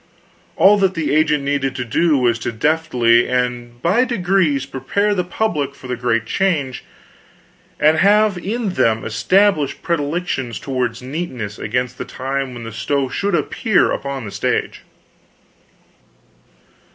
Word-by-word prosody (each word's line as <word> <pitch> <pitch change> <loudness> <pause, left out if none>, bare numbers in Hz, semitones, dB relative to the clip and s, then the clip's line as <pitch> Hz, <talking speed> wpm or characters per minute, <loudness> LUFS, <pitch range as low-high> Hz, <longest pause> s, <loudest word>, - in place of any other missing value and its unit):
All 205 +1 +5
that 190 -1 +2
the 160 -3 -1
agent 150 -2 +2
needed 140 -1 -1
to 125 - -3
do 155 +6 +2
was 120 -3 +1
to 115 - -3
deftly 120 -2 +2
and 125 -1 -2
by 200 +9 +3
degrees 180 - +1
prepare 140 +11 -1
the 180 -3 0
public 155 -8 -2
for 135 - -15
the 125 - -2
great 115 -1 0
change, 150 -5 -1 1.0
and 155 +1 +4
have 205 -1 +3 0.3
them 115 -8 +1
established 150 - +2
in - - -30
predilections 150 -6 -2
toward 125 -3 -2
neatness 130 -8 -5
against 125 +3 -2
the - - -4
time 135 0 -4
when 120 - -8
the 115 - -7
stove 135 +3 -2
should 200 -2 0
appear 205 - +1
upon 140 -3 -4
the 100 - -7
stage. - - -2
140 Hz, 140 wpm, -19 LUFS, 125-175 Hz, 1.0 s, All